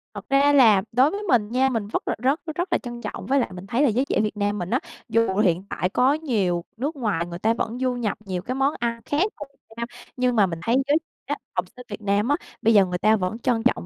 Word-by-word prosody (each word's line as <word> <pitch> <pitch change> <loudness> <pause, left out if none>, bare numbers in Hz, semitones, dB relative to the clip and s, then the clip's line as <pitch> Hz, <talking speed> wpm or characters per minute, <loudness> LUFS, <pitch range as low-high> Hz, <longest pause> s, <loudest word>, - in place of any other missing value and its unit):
Thật - - -7
ra 280 +1 +4
là 225 -8 +6
đối 260 +6 +4
với 410 +1 -4
mình 235 - +2
nha, 260 +2 +3
mình 225 -5 -2
vất - - -3
là - - 0
rất 275 +5 +2 0.2
rất 350 +3 -1
là - - +4
trân 240 -1 -8
trọng. - - -6
Với 275 +1 +2
lại 245 - 0
mình 180 +1 -9
thấy 235 +6 0
là - - +5
giới 245 +5 +1
trẻ - - 0
Việt 210 -1 -2
Nam 205 0 0
mình 175 - -4
á, 250 - +2 0.3
dù 230 -3 +2
hiện 185 -4 +2
tại 180 - -1
có 255 +7 +3
nhiều 210 - 0
nước 285 +7 -2
ngoài 210 - -1
người 170 0 -7
ta 220 +4 +2
vẫn 230 +1 -3
du 255 -1 +1
nhập 230 -4 -2
nhiều 185 -2 -3
cái 250 +7 -4
món 270 +2 +2
ăn 235 -1 -2
khác 295 +5 +1 0.2
vào 290 - -6
Việt - - -39
Nam, 235 0 -3 0.3
nhưng 250 -1 +1
mà 210 - +5
mình 165 -3 -4
thấy 230 +7 +2
giới 295 +2 +4 0.3
trẻ 290 - -1
á, - - -1 0.2
học 180 -1 0
sinh 250 -1 -11
Việt 205 0 -7
Nam 205 +1 +1
á, 290 - +4 0.3
bây 225 +1 +4
giờ 200 -2 +6
người 180 0 -3
ta 215 +4 +4
vẫn 195 +2 -2
trân 235 -2 0
trọng 245 -7 +1
230 Hz, 280 wpm, -24 LUFS, 205-265 Hz, 0.3 s, là